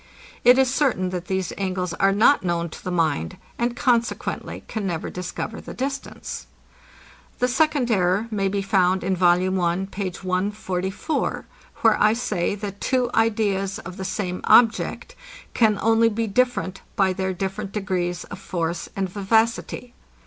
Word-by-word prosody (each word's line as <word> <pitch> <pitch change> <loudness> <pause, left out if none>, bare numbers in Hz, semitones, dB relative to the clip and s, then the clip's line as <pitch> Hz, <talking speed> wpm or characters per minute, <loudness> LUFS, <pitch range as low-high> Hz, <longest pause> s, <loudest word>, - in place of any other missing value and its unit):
It 245 +1 +7
is 265 -1 +3
certain, 235 -11 +1
that 180 -1 -4
these 190 -2 -1
angles 185 -2 -2
are 195 +3 +3
not 215 +8 +5
known 170 -1 -1
to - - -11
the - - -3
mind, 160 - 0 0.2
and 240 0 0
consequently 240 -3 -1
can 215 -3 -3
never 165 -3 -3
discover 180 +4 -5
the - - -9
distance. 275 +2 -5 0.9
The 250 - +2
second 275 -1 +2
error 190 +2 +2
may 200 -2 0
be 195 0 -1
found 190 -1 +2
in 190 +1 +1
Vol. 180 +1 +3
I. 175 +2 0
page 190 -2 -4
144 190 - -2 0.4
where - - +4
I 215 +1 +5
say, 210 -6 -1
that 200 -1 -7
two 250 -2 +1
ideas 205 -3 +1
of 185 -1 -9
the 190 - -4
same 185 -1 -3
object 240 - +3 0.4
can 220 -3 +3
only 225 +1 +4
be 225 +1 -1
different 225 -3 0
by 190 -2 +3
their 190 0 -1
different 195 +2 -4
degrees 180 -4 -2
of 185 - -9
force 170 -2 -3
and 195 -1 -1
vivacity. 225 +5 0
195 Hz, 155 wpm, -23 LUFS, 185-225 Hz, 0.9 s, It